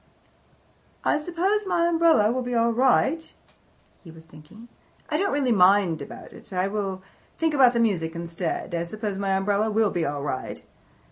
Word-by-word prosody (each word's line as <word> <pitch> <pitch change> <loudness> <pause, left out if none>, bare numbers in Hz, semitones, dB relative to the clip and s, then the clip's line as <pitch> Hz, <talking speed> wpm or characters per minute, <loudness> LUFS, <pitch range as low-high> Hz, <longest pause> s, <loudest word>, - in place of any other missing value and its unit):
"I - - +2
suppose 370 +6 -1
my 345 -2 +1
umbrella 330 -10 +3
will 255 +1 -1
be 245 -1 -3
all 230 0 +2
right," 270 +6 +2 0.7
he 170 - -13
was 160 0 -14
thinking. 160 +9 -15 0.4
"I - - 0
don't 400 0 0
really 275 -3 +1
mind 185 -5 +4
about 140 - -10
it. - - -15
I 185 0 0
will 195 -2 -4 0.3
think 325 -1 0
about 250 -4 +4
music 175 -8 0
instead. 170 +1 -4
I 170 0 -1
suppose 210 +1 -5
my 195 -1 0
umbrella 205 +2 0
will 215 -1 +1
be 175 - -1
all 145 -2 -3
right." 130 -3 -5
210 Hz, 165 wpm, -24 LUFS, 175-265 Hz, 0.7 s, mind